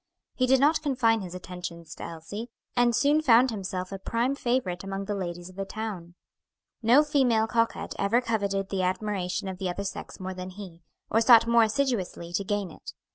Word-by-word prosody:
He 255 Hz, -, +1 dB
did 265 Hz, +1 st, +5 dB
not 300 Hz, +4 st, +4 dB
confine 245 Hz, -7 st, +2 dB
his 180 Hz, -1 st, -7 dB
attentions 175 Hz, -3 st, -7 dB
to -, -, -9 dB
Elsie, 185 Hz, +8 st, -7 dB, 0.3 s
and 240 Hz, -1 st, +3 dB
soon 290 Hz, +5 st, +3 dB
found 250 Hz, -3 st, +5 dB
himself 185 Hz, -3 st, -4 dB
a 195 Hz, -, -5 dB
prime 235 Hz, +6 st, 0 dB
favorite 240 Hz, -10 st, -1 dB
among 195 Hz, 0 st, -4 dB
the 205 Hz, -, -2 dB
ladies 175 Hz, -3 st, -4 dB
of 185 Hz, 0 st, -14 dB
the 195 Hz, -, -2 dB
town. 195 Hz, -4 st, -6 dB, 0.7 s
No 245 Hz, +6 st, +6 dB
female 255 Hz, -7 st, +2 dB
coquette 230 Hz, 0 st, -1 dB
ever 200 Hz, +4 st, +3 dB
coveted 200 Hz, -5 st, -1 dB
the 195 Hz, -1 st, -1 dB
admiration 190 Hz, 0 st, -1 dB
of 185 Hz, -1 st, -5 dB
the 190 Hz, -2 st, -1 dB
other 190 Hz, +3 st, -3 dB
sex 195 Hz, -, -6 dB
more 185 Hz, 0 st, -4 dB
than 185 Hz, 0 st, -6 dB
he, 185 Hz, -3 st, -10 dB, 0.3 s
or 225 Hz, -, +4 dB
sought 230 Hz, 0 st, +7 dB
more 235 Hz, 0 st, +5 dB
assiduously 220 Hz, -8 st, -1 dB
to 200 Hz, -, 0 dB
gain 200 Hz, -2 st, -2 dB
it. -, -, -10 dB
205 Hz, 190 wpm, -27 LUFS, 185-235 Hz, 0.7 s, sought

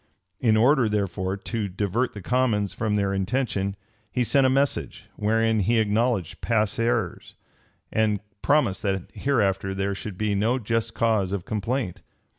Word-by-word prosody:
In 110 Hz, -3 st, +3 dB
order, 125 Hz, 0 st, +4 dB
therefore, 95 Hz, -2 st, -1 dB
to 110 Hz, +1 st, -3 dB
divert 105 Hz, +6 st, -1 dB
the 105 Hz, -, -8 dB
commons 115 Hz, -4 st, +1 dB
from 110 Hz, -2 st, -1 dB
their 100 Hz, -1 st, +1 dB
intention, 100 Hz, -1 st, -1 dB, 0.4 s
he 125 Hz, -, +1 dB
sent 135 Hz, +2 st, +4 dB
a -, -, +3 dB
message, 135 Hz, +2 st, 0 dB
wherein 115 Hz, +1 st, +2 dB
he 115 Hz, +4 st, +2 dB
acknowledged 110 Hz, -3 st, 0 dB
past 110 Hz, -2 st, +1 dB
errors, 115 Hz, -5 st, -1 dB, 0.6 s
and 110 Hz, -2 st, +1 dB, 0.2 s
promised 135 Hz, -10 st, +2 dB
that 95 Hz, -2 st, -2 dB
hereafter 95 Hz, -8 st, 0 dB
there 100 Hz, +1 st, -1 dB
should 100 Hz, -1 st, -7 dB
be 105 Hz, 0 st, 0 dB
no 110 Hz, +6 st, +2 dB
just 115 Hz, -1 st, -2 dB
cause 110 Hz, -5 st, +1 dB
of 100 Hz, -3 st, -3 dB
complaint. 110 Hz, -1 st, -2 dB
110 Hz, 150 wpm, -25 LUFS, 100-120 Hz, 0.6 s, order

